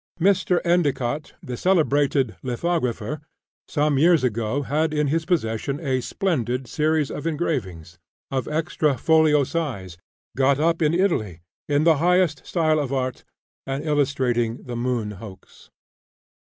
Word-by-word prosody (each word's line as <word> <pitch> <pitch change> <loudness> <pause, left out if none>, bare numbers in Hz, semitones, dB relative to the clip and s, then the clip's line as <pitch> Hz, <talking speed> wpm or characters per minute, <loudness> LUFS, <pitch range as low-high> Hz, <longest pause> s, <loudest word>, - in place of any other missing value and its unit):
Mr. 185 -1 +3
Endicott, 150 -5 0
the 125 -5 -5
celebrated 145 - +2
lithographer, 130 -1 -2 0.5
some 150 -2 +1
years 165 -1 +4
ago 115 +3 -1
had 155 +3 0
in 150 -1 +1
his 160 +2 0
possession 140 -4 -1
a 130 -5 -1
splendid 130 - -1
series 155 +3 0
of 150 - -4
engravings, 95 - -3 0.3
of 130 -1 -2
extra 155 -2 0
folio 155 -1 +4
size, 125 - -4 0.4
got 135 +1 +3
up 165 +2 +1
in 155 +1 +2
Italy, 110 - 0 0.3
in 145 +1 +2
the 165 -2 +5
highest 175 -2 +2
style 155 -3 +2
of 140 -3 -2
art, 130 -1 -2 0.4
and 135 +2 -3
illustrating 130 -6 0
the 125 - -6
"Moon 120 -3 -1
Hoax." 100 -4 -13
145 Hz, 130 wpm, -23 LUFS, 125-160 Hz, 0.5 s, the